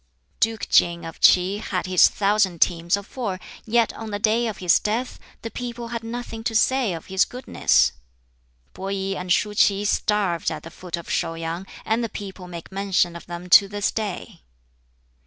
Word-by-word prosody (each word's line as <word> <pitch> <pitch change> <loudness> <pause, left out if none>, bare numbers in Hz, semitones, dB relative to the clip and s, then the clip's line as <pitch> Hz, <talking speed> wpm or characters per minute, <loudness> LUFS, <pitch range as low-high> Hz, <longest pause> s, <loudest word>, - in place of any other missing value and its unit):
"Duke 225 -1 0
King 170 0 +3
of 165 - -9
Ts'i 185 +3 +5
had 190 -4 -3
his 185 -1 +6
thousand 200 -4 +1
teams 170 +3 +2
of 200 - -8
four, 205 -8 -4 0.3
yet 230 0 +2
on 225 -1 -7
the 205 - -2
day 220 +3 +2
of 215 - -4
his 180 -2 +3
death 230 +4 -2 0.2
the 230 - -5
people 240 -1 -6
had 230 -1 -4
nothing 230 -1 -6
to 225 - -1
say 250 -2 +2
of 165 - -7
his 190 0 +2
goodness. 250 +1 +2 0.8
Peh - - -13
I 195 0 -2
and 180 0 -5
Shuh 210 +3 +2
Ts'i 205 -1 +3
starved 200 -5 +1
at 155 -2 -6
the 165 - -10
foot 180 0 -6
of 170 - -9
Shau 165 - -1
yang, 165 +3 -5 0.2
and 225 +2 0
the 230 - -2
people 195 -2 -8
make 170 0 -9
mention 190 -3 0
of 170 - -10
them 175 +1 -7
to 200 - +8
this 205 0 -1
day. 210 -3 -5
200 Hz, 190 wpm, -23 LUFS, 180-225 Hz, 0.8 s, to